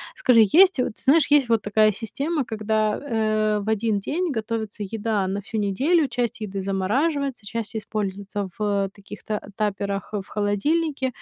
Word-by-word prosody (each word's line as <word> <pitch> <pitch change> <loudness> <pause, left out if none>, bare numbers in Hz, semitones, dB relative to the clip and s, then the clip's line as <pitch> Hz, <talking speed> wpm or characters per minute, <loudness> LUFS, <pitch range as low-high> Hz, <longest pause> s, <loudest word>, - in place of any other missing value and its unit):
Скажи, 235 -4 +5
есть 370 -2 +6
вот 250 - -2
знаешь, 290 +4 +4
есть 285 -4 +5
вот 225 -2 +3
такая 215 +1 +3
система, 275 - -3
когда, 215 -1 0
э, 215 -4 0
в 215 - -3
1 220 -1 +1
день 335 - -2
готовится 220 -1 -3
еда 210 -1 -1
на 195 +2 -2
всю 220 +3 -6
неделю, 280 - +2
часть 240 -2 -2
еды 200 -2 -4
замораживается, 250 - -1
часть 225 +2 -5
используется 205 -2 -3
в 200 -2 0
таких 200 -1 -12
т 215 -1 -2 0.2
таперах 200 -1 -2
в 200 -2 -3
холодильнике 265 +9 0
215 Hz, 155 wpm, -24 LUFS, 205-255 Hz, 0.2 s, есть